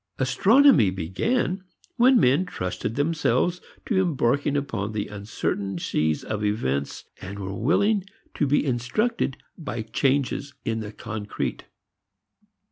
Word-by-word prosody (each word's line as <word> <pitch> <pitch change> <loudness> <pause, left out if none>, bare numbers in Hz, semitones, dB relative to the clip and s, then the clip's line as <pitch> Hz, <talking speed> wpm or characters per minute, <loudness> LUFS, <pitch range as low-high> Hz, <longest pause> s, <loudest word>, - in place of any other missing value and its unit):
Astronomy 195 - +5
began 175 - -1 0.3
when 250 0 +5
men 145 +7 +3
trusted 95 - -4
themselves 165 +4 +1 0.2
to 195 -5 +2
embarking 145 -4 +1
upon 115 -7 -3
the 105 -1 -2
uncertain 100 -1 -3
sea 80 -2 0
of 105 -1 -3
events 70 - -1 0.2
and 95 +2 -7
were 95 -1 -5
willing 190 - +2 0.3
to 145 - 0
be 145 +2 +2
instructed 135 - 0 0.2
by 120 -8 -4
changes 135 +4 0
in 115 0 -1
the 105 -2 -6
concrete. 105 -1 -5
125 Hz, 120 wpm, -25 LUFS, -, 0.3 s, Astronomy